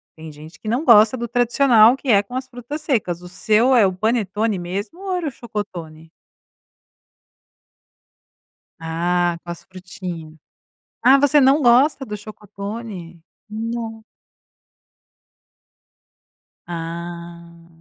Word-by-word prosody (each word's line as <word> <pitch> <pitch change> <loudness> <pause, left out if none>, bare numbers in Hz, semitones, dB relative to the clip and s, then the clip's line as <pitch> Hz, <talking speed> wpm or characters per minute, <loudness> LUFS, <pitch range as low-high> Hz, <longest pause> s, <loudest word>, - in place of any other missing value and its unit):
tem 160 -1 -10
gente 155 +3 -14
que 215 - -11
não 245 +8 0
gosta 220 -2 +6
do 235 0 -4
tradicional 240 -1 +4
que 270 -1 -7
é 200 -3 +5
com 245 +5 -10
as 260 0 -4
frutas 255 +4 -7
secas. 205 - -1
O 180 - -10
seu 220 +7 +2
é 220 -4 +6
o 185 - 0
panetone 215 0 -1
mesmo 200 - -5
ou 385 -2 -3
era 340 -4 -2
o - - -3
chocotone? 170 -9 -7 2.7
Ah, 175 +1 0
com 175 - -7
as 170 - -9
frutinhas. 180 -4 -9 0.7
Ah, 265 +2 +6
você 285 +1 +4
não 275 +2 +4
gosta 270 +4 +4
do 210 - -5
chocotone? 205 -3 -8 0.3
Nossa! 225 0 -5 2.6
Ah. 170 0 -8
210 Hz, 120 wpm, -20 LUFS, 175-245 Hz, 2.7 s, gosta